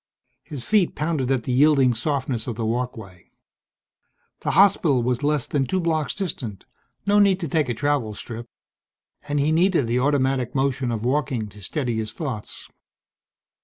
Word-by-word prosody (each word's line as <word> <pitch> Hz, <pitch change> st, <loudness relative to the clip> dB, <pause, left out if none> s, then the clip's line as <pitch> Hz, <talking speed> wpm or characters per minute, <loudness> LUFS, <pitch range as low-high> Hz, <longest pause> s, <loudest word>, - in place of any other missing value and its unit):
His 145 Hz, -6 st, -7 dB
feet 205 Hz, -, +2 dB
pounded 150 Hz, -4 st, -1 dB
at 130 Hz, -3 st, +1 dB
the 130 Hz, -, -3 dB
yielding 135 Hz, -1 st, +4 dB
softness 125 Hz, -1 st, -2 dB
of 120 Hz, -, -3 dB
the 115 Hz, 0 st, -3 dB
walkway. 110 Hz, -6 st, -4 dB, 1.1 s
The -, -, -3 dB
hospital 160 Hz, -10 st, +4 dB
was 125 Hz, +1 st, 0 dB
less 150 Hz, -2 st, +1 dB
than 135 Hz, -3 st, -1 dB
two 190 Hz, -, 0 dB
blocks 160 Hz, -3 st, -1 dB
distant 130 Hz, -, -5 dB, 0.4 s
no 205 Hz, +1 st, +4 dB
need 195 Hz, -2 st, +4 dB
to 165 Hz, -, -2 dB
take 150 Hz, -2 st, 0 dB
a 120 Hz, -, -1 dB
travel 140 Hz, -6 st, 0 dB
strip 115 Hz, +1 st, -8 dB, 0.8 s
and 145 Hz, 0 st, 0 dB
he 145 Hz, +2 st, +2 dB
needed 170 Hz, -3 st, +3 dB
the 120 Hz, +2 st, 0 dB
automatic 135 Hz, -2 st, +1 dB
motion 135 Hz, -2 st, 0 dB
of 115 Hz, 0 st, -3 dB
walking 130 Hz, -5 st, 0 dB
to 105 Hz, +1 st, -14 dB
steady 120 Hz, -, -2 dB
his 110 Hz, 0 st, -3 dB
thoughts. 130 Hz, -9 st, -6 dB
135 Hz, 165 wpm, -23 LUFS, 120-150 Hz, 1.1 s, yielding